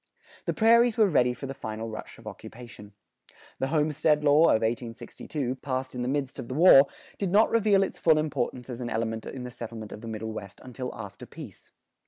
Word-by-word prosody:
The - - 0
prairies 230 +1 +4
were 215 -2 +5
ready 125 -8 +3
for 125 +3 -7
the 135 - -5
final 110 -3 -6
rush 110 -1 -8
of 115 - -17
occupation. 110 -1 -11 0.7
The 135 - 0
homestead 150 0 +1
law 150 +2 +5
of 110 - +3
1862, 120 +3 -4
passed 130 -1 -4
in 125 - -4
the 125 - -2
midst 135 0 -2
of - - -6
the 130 - -5
war, 145 -4 +8 0.3
did 195 - -1
not 210 +5 +4
reveal 210 -3 +4
its - - -5
full 160 -2 +4
importance 145 -5 -2
as 125 -1 -6
an 120 - -3
element 110 0 -3
in 130 - -6
the 125 - -7
settlement 115 -2 -8
of 105 - -9
the 115 - -8
Middle 110 0 -5
West 100 -3 -8
until 125 0 -6
after 105 -3 -9
peace. - - -12
130 Hz, 205 wpm, -27 LUFS, 115-155 Hz, 0.7 s, war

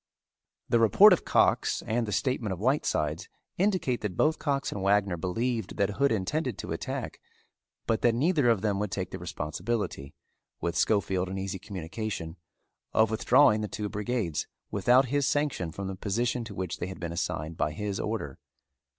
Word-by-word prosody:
The 120 - +3
report 185 - +7
of 180 - -1
Cox - - +2
and 115 +1 0
the - - -3
statement 115 -1 0
of 90 - -7
Whitesides 100 - 0 0.3
indicate 185 - +1
that 100 -4 -4
both 155 +1 +2
Cox 140 -3 -1
and 100 - -4
Wagner 100 -1 +2
believed 110 +5 -2
that 100 0 +1
Hood 140 +6 +2
intended 115 - -1
to - - -6
attack - - -4 0.6
but 115 -1 0
that 120 -1 +3
neither 145 -1 +3
of 115 -5 +3
them 100 -2 0
would 105 0 -1
take 95 -2 -4
the - - -6
responsibility, 85 -2 -4 0.4
with 85 0 -2
Schofield 95 0 +1
in 95 - -4
easy 95 0 -4
communication, 95 -2 -5 0.6
of 110 0 +4
withdrawing 110 0 +4
the 105 - -2
two 105 0 -4
brigades 105 -5 -2 0.2
without 120 +7 +4
his 140 0 +1
sanction 140 - 0
from 100 +5 -6
the 95 - -3
position 115 +5 -1
to - - -9
which 95 -3 -4
they - - -3
had 95 - -8
been 85 -1 -4
assigned 85 -2 -3
by 75 - 0
his 100 +4 -3
order. 105 -11 -3
105 Hz, 175 wpm, -28 LUFS, 95-120 Hz, 0.6 s, report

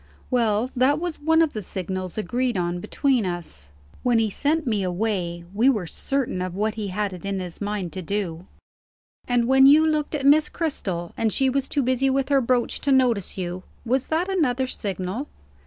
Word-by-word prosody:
"Well, 235 0 +1
that 265 +4 +3
was 345 -3 -4
one 320 +2 +4
of 315 - -1
the 215 - -4
signals 185 0 -5
agreed 240 +3 -1
on 175 0 -1
between 260 +5 +1
us. 170 - -4 0.3
When 245 -2 +2
he 220 -2 +1
sent 300 +7 0
me 215 -5 0
away, 180 -2 -2
we 230 +6 +4
were 215 -9 0
certain 255 - -2
of 180 -1 -4
what 215 +2 0
he 215 -2 -4
had 200 +1 -2
it 180 - -9
in 200 -1 -2
his 180 0 -6
mind 205 -4 -3
to 185 - -5
do." 180 -2 -3 0.8
"And 245 -1 +2
when 265 +1 +6
you 305 +3 +7
looked 305 -1 0
at 275 -2 -2
Miss 300 +2 +5
Cristel, 190 - -3
and 225 -1 0
she 265 +2 +2
was 275 0 -1
too 285 - +1
busy 260 +2 +2
with 270 0 0
her 275 -1 +4
brooch 245 0 0
to 280 - +1
notice 245 -9 +2
you, 180 0 -4 0.2
was 255 +3 0
that 325 +4 0
another 280 -10 +1
signal?" 200 +2 -4
230 Hz, 195 wpm, -24 LUFS, 185-270 Hz, 0.8 s, you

